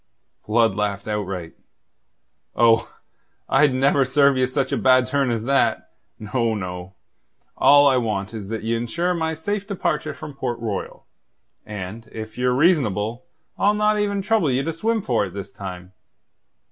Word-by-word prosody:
Blood 115 Hz, -1 st, +3 dB
laughed 100 Hz, 0 st, -2 dB
outright. 95 Hz, -5 st, -4 dB, 1.0 s
"Oh, 115 Hz, -1 st, +3 dB, 0.6 s
I'd 145 Hz, +1 st, +4 dB
never 135 Hz, +2 st, +3 dB
serve 140 Hz, +1 st, +3 dB
ye 130 Hz, 0 st, +2 dB
such 130 Hz, 0 st, -1 dB
a -, -, +1 dB
bad 130 Hz, -1 st, +4 dB
turn 135 Hz, 0 st, 0 dB
as 115 Hz, -2 st, -1 dB
that. 135 Hz, -, +1 dB, 0.3 s
No, 110 Hz, +1 st, -1 dB
no. 90 Hz, -1 st, -6 dB, 0.6 s
All 145 Hz, 0 st, +6 dB
I 135 Hz, -2 st, +4 dB
want 105 Hz, -3 st, -2 dB
is 105 Hz, -3 st, -7 dB
that 110 Hz, -1 st, -4 dB
ye 115 Hz, +1 st, -1 dB
ensure 170 Hz, +10 st, -1 dB
my 160 Hz, -2 st, -2 dB
safe 200 Hz, +5 st, -3 dB
departure 155 Hz, -6 st, -2 dB
from 145 Hz, -, -9 dB
Port 130 Hz, -3 st, -3 dB
Royal. 110 Hz, -4 st, -5 dB, 0.6 s
And, 105 Hz, +2 st, -7 dB
if 110 Hz, 0 st, -8 dB
ye're 125 Hz, 0 st, +1 dB
reasonable, 120 Hz, -, +1 dB, 0.3 s
I'll 205 Hz, +1 st, +3 dB
not 210 Hz, 0 st, +2 dB
even 200 Hz, -1 st, -1 dB
trouble 210 Hz, -7 st, +2 dB
you 130 Hz, +1 st, +1 dB
to 165 Hz, -, -2 dB
swim 220 Hz, +5 st, -1 dB
for 120 Hz, -5 st, +1 dB
it 95 Hz, -, -12 dB
this 100 Hz, -2 st, -7 dB
time. 90 Hz, -1 st, -8 dB
125 Hz, 160 wpm, -22 LUFS, 105-150 Hz, 1.0 s, All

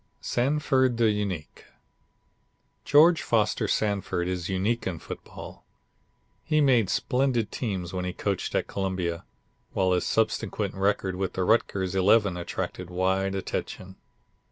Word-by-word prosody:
Sanford 130 Hz, -1 st, +1 dB
the 115 Hz, -2 st, +4 dB
Unique 100 Hz, -7 st, -4 dB, 1.2 s
George 160 Hz, +4 st, +5 dB
Foster 110 Hz, -3 st, +1 dB
Sanford 100 Hz, -4 st, 0 dB
is 90 Hz, 0 st, -3 dB
unique 100 Hz, +5 st, 0 dB
in 90 Hz, -3 st, -3 dB
football. -, -, -10 dB, 0.8 s
He 155 Hz, -1 st, +1 dB
made 125 Hz, -9 st, +4 dB
splendid 125 Hz, -5 st, 0 dB
teams 95 Hz, -7 st, -3 dB
when 90 Hz, -1 st, -2 dB
he 90 Hz, -, -2 dB
coached 100 Hz, +1 st, -3 dB
at -, -, +1 dB
Columbia, 95 Hz, -3 st, -3 dB, 0.5 s
while 95 Hz, -1 st, +2 dB
his 90 Hz, -, +2 dB
subsequent 110 Hz, -2 st, 0 dB
record 95 Hz, -1 st, 0 dB
with 95 Hz, -1 st, -2 dB
the 95 Hz, -, -1 dB
Rutgers 95 Hz, -3 st, +1 dB
Eleven 100 Hz, 0 st, +3 dB
attracted 90 Hz, +1 st, -5 dB
wide 95 Hz, +2 st, 0 dB
attention. 95 Hz, 0 st, -5 dB
95 Hz, 125 wpm, -26 LUFS, 95-115 Hz, 1.2 s, George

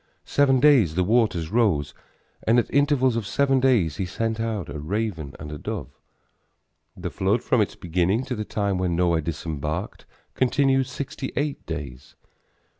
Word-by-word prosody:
Seven 135 Hz, -2 st, +3 dB
days 125 Hz, -, +5 dB
the 90 Hz, -, +2 dB
waters 100 Hz, -6 st, +1 dB
rose, 105 Hz, -11 st, +1 dB, 0.5 s
and 115 Hz, +2 st, +3 dB
at 120 Hz, -, 0 dB
intervals 140 Hz, -3 st, +3 dB
of 115 Hz, -3 st, -2 dB
seven 135 Hz, +4 st, +2 dB
days 120 Hz, -, +2 dB
he 95 Hz, -, -1 dB
sent 115 Hz, +4 st, -2 dB
out 110 Hz, -5 st, -2 dB
a 70 Hz, +2 st, -6 dB
raven 85 Hz, -3 st, -3 dB
and 75 Hz, -1 st, -7 dB
a 75 Hz, -, -6 dB
dove. -, -, -5 dB, 1.1 s
The -, -, -5 dB
flood -, -, 0 dB
from -, -, +2 dB
its -, -, -1 dB
beginning 90 Hz, +7 st, 0 dB
to 130 Hz, -, -3 dB
the 110 Hz, -, -3 dB
time 100 Hz, -3 st, -1 dB
when 90 Hz, -2 st, 0 dB
Noah 85 Hz, -2 st, +2 dB
disembarked 80 Hz, +2 st, -4 dB, 0.3 s
continued 135 Hz, 0 st, +2 dB
sixty 135 Hz, 0 st, -5 dB
eight 145 Hz, +1 st, -2 dB
days. 70 Hz, -6 st, -7 dB
105 Hz, 160 wpm, -24 LUFS, 85-130 Hz, 1.1 s, days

